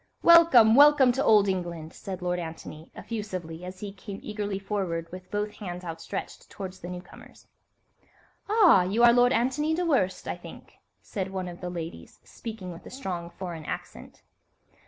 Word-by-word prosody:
"Welcome! 330 -10 +7
Welcome 285 -1 +7
to 265 +3 -1
old 210 -2 +5
England!" 170 -4 -3
said 185 -2 -7
Lord 180 0 -1
Antony, 160 -1 -8
effusively, 185 -7 -6
as 185 +1 -8
he 205 -2 -6
came 195 0 -9
eagerly 205 -2 -3
forward 195 -4 -3
with 185 0 -10
both 210 0 -2
hands 180 -3 -7
outstretched 165 +3 -6
towards 190 -2 -8
the 175 - -8
newcomers. 180 0 -11 1.0
"Ah, 405 - +6
you 200 +6 +1
are 240 0 +8
Lord 245 0 +5
Antony 275 +6 +1
Dewhurst, 270 - 0
I - - -3
think," - - -12 0.3
said 190 -2 -4
one 190 -1 -4
of 175 -1 -9
the 180 - -4
ladies, 170 -1 -8
speaking 220 -6 -8
with 170 - -11
a - - -8
strong 180 -10 -5
foreign 170 -3 -7
accent. - - -8
195 Hz, 160 wpm, -27 LUFS, 180-230 Hz, 1.0 s, are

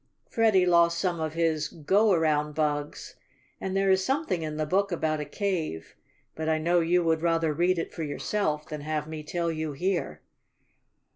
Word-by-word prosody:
Freddie 215 -5 +3
lost 170 -1 +4
some 175 -1 -1
of 160 0 -3
his 160 -2 +1
"go 195 +9 +2
around" 150 -3 +1
bugs, 150 -1 -2 0.4
and 190 0 -2
there 195 0 +3
is 190 0 +3
something 265 - -1
in 155 -1 -4
the 155 - 0
book 195 +5 +1
about 160 -2 -1
a 150 - -3
cave, 160 - -3 0.4
but 160 0 -3
I 160 - +2
know 170 +3 +2
you 175 +1 +2
would 160 -1 +1
rather 165 -2 +1
read 175 +4 +2
it 165 - -4
for 165 - -6
yourself 155 +1 -2
than 150 -1 -6
have 150 0 -3
me 155 -1 -6
tell 170 +2 -2
you 155 -2 -3
here. 165 - -2
165 Hz, 185 wpm, -27 LUFS, 155-180 Hz, 0.4 s, lost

